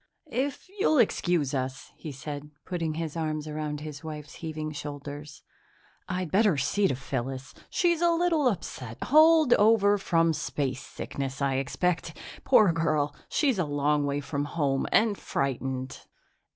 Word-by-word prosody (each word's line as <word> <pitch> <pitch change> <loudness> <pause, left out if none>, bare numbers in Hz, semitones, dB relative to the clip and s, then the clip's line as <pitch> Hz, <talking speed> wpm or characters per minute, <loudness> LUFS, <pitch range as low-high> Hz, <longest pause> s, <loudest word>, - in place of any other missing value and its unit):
"If 270 +7 -2
you'll 315 -6 +3
excuse 175 - +2
us," 130 0 -3
he 155 - -7
said, 145 +2 -7 0.2
putting 165 -4 -2
his 160 -1 -4
arm 155 -2 -1
around 150 -1 -4
his 150 -1 -7
wife's 150 -2 -7
heaving 155 -1 -4
shoulders, 145 +1 -7 0.7
"I'd 180 -3 -2
better 200 -5 +4
see 195 +8 +2
to 135 - 0
Phyllis; 130 0 -4 0.2
she's 345 -2 +2
a 345 - +5
little 335 -4 +2
upset. 130 - -3
Holdover 240 -10 +5
from 165 -3 +2
spacesickness, 135 -1 -4
I 135 -2 +1
expect. 165 +4 -1 0.3
Poor 215 -8 +6
girl, 155 -3 0
she's 270 -9 +1
a 180 - +2
long 145 0 +1
way 140 +1 -1
from 145 0 -2
home 145 -3 0
and 220 -2 +4
frightened." 130 -1 -2
155 Hz, 140 wpm, -28 LUFS, 140-200 Hz, 0.7 s, Poor